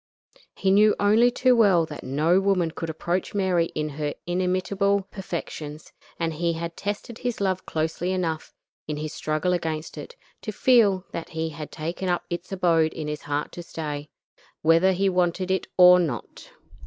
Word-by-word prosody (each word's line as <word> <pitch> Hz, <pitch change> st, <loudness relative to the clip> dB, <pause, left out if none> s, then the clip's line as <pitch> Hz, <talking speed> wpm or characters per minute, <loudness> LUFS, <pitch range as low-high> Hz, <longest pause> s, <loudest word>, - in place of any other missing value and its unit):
He 190 Hz, -, +1 dB
knew 210 Hz, +2 st, +5 dB
only 215 Hz, +4 st, +5 dB
too 255 Hz, +1 st, +3 dB
well 195 Hz, -8 st, +5 dB
that 150 Hz, -2 st, -9 dB
no 155 Hz, +7 st, +2 dB
woman 190 Hz, -4 st, +1 dB
could 165 Hz, 0 st, -5 dB
approach 175 Hz, +5 st, -2 dB
Mary 185 Hz, -4 st, +2 dB
in 155 Hz, 0 st, -1 dB
her 150 Hz, 0 st, -3 dB
inimitable 185 Hz, +2 st, 0 dB
perfections, 160 Hz, -5 st, -6 dB, 0.3 s
and 165 Hz, -1 st, -1 dB
he 170 Hz, +2 st, 0 dB
had 165 Hz, 0 st, -5 dB
tested 205 Hz, +3 st, -5 dB
his 245 Hz, -2 st, -3 dB
love 190 Hz, -2 st, -1 dB
closely 160 Hz, +3 st, -1 dB
enough, 165 Hz, -4 st, -2 dB, 0.4 s
in 150 Hz, -1 st, -3 dB
his 155 Hz, 0 st, -4 dB
struggle 155 Hz, +4 st, -1 dB
against 160 Hz, -2 st, -3 dB
it, 485 Hz, -, -9 dB, 0.3 s
to 215 Hz, -, -4 dB
feel 205 Hz, -5 st, +4 dB
that 165 Hz, -1 st, -7 dB
it 160 Hz, 0 st, -1 dB
had 150 Hz, 0 st, -8 dB
taken 170 Hz, +4 st, -4 dB
up 175 Hz, -, 0 dB
its 175 Hz, +2 st, -5 dB
abode 170 Hz, -4 st, +2 dB
in 155 Hz, -2 st, -5 dB
his 150 Hz, 0 st, -4 dB
heart 145 Hz, 0 st, -3 dB
to 175 Hz, -, -7 dB
stay, 150 Hz, -3 st, -6 dB, 0.5 s
whether 165 Hz, +4 st, +5 dB
he 195 Hz, +2 st, +1 dB
wanted 180 Hz, 0 st, +1 dB
it 190 Hz, -, 0 dB
or 180 Hz, 0 st, +9 dB
not. 145 Hz, -10 st, -4 dB
175 Hz, 170 wpm, -25 LUFS, 160-190 Hz, 0.5 s, or